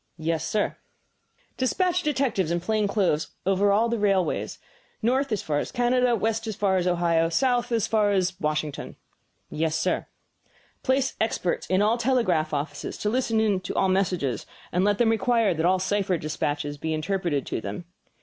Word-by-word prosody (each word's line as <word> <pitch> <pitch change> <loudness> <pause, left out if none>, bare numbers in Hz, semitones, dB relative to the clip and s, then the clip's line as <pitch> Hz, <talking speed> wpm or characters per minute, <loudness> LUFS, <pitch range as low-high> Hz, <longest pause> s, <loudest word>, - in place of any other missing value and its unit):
"Yes, 160 0 -1
sir." 210 +4 -1 0.8
"Despatch 360 +7 +1
detectives 265 - 0
in 170 0 0
plain 210 +4 0
clothes 190 -7 0
over 195 +1 +3
all 215 +4 +3
the 235 -1 -1
railways, 195 -3 0 0.5
north 260 +3 +1
as 215 - -1
far 145 -2 0
as - - -4
Canada, 245 0 +2
west 225 +1 -1
as 215 - -3
far 190 -1 +1
as 180 0 0
Ohio, 170 -2 +2
south 245 +6 +1
as 225 -2 +2
far 215 -2 +2
as 190 -2 +1
Washington." 150 -1 -3 0.6
"Yes, 160 0 -1
sir." - - 0 0.7
"Place 265 0 +1
experts 200 -5 -1
in 185 +2 +2
all 220 +3 +3
the 235 - -4
telegraph 200 -12 +2
offices 145 0 -4
to 210 - -1
listen 220 -5 +1
to - - -6
all 190 - +2
messages; 180 -9 0 0.2
and 180 - +1
let 205 0 +2
them 225 -1 +3
require 225 -3 +2
that 165 +1 +1
all 185 +1 +4
cipher 190 -1 0
despatches 145 -1 -3
be 160 +1 -2
interpreted 165 -3 -1
to - - -3
them." 105 - -6
195 Hz, 170 wpm, -25 LUFS, 165-225 Hz, 0.8 s, all